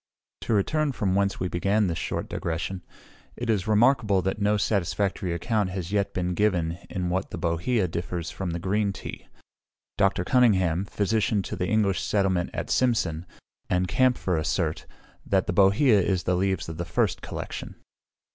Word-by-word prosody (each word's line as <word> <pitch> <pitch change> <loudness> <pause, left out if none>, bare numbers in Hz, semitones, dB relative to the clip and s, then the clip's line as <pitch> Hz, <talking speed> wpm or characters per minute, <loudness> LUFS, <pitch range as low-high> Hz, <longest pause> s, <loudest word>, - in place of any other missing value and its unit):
To - - -1
return 145 +8 +1
from 100 -6 0
whence 100 0 +1
we 90 - -1
began 100 +5 +1
this 85 -3 -2
short - - -3
digression. 85 +3 -3 0.5
It 120 -1 -1
is 105 -2 -1
remarkable 110 -3 +3
that 95 +3 -2
no 105 +1 +3
satisfactory 100 -2 0
account 100 +4 0
has 90 -1 -5
yet 100 -1 0
been 90 -1 -2
given 90 -4 0
in 90 -2 -2
what 95 +2 -1
the - - -6
bohea 90 +5 0
differs 85 0 -4
from 95 -2 -4
the 85 - -2
green 100 +3 0
tea. 90 - -8 0.7
Dr. 95 -2 +2
Cunningham, 95 -8 +3
physician 105 0 0
to - - -5
the 90 - -2
English 105 -4 +1
settlement 95 -4 +1
at - - -4
Cimsan, 90 -10 +1 0.4
and 90 0 +1
Kampfer 120 -3 +2
assert, 80 - -1 0.4
that 95 -1 +1
the - - -2
bohea 100 +4 +5
is 95 -2 0
the 90 - +1
leaves 95 -1 0
of 80 -1 -6
the 85 - -2
first - - 0
collection. - - -6
95 Hz, 165 wpm, -26 LUFS, 90-105 Hz, 0.7 s, bohea